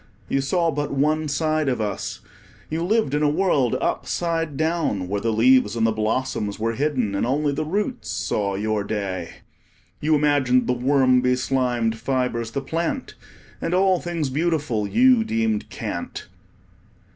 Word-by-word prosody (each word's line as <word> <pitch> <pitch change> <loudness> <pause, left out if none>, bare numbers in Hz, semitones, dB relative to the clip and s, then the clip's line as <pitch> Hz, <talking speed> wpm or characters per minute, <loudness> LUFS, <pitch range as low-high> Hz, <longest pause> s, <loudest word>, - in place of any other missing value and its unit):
You 135 - +1
saw 165 +4 +1
but 145 0 -3
one 155 +3 +1
side 155 0 0
of 125 - -1
us. 105 -2 -3 0.5
You 160 +2 -1
lived 210 -6 +1
in 150 - +1
a 150 - +3
world 145 -7 +2
upside 165 -4 -1
down, 160 - 0
where 100 +2 -2
the 115 - 0
leaves 115 0 +4
and 115 -1 +1
the 115 - +3
blossoms 110 -1 -1
were 115 +1 -1
hidden, 130 -5 0
and 100 - -1
only 145 +4 +1
the 140 - -2
roots 205 - -2
saw 100 +2 -1
your 105 +1 -1
day. 100 -5 -3 0.7
You 155 +1 +2
imagined 145 -4 +3
the 125 - +1
worm 130 0 +3
beslimed 125 -2 0
fibres 120 -1 -1
the 140 +4 -3
plant, 170 - -3 0.5
and 170 - 0
all 190 -1 +3
things 165 -6 -3
beautiful 145 -8 0
you 250 - +4
deemed 110 - -1
cant. - - -5
135 Hz, 155 wpm, -23 LUFS, 115-155 Hz, 0.7 s, leaves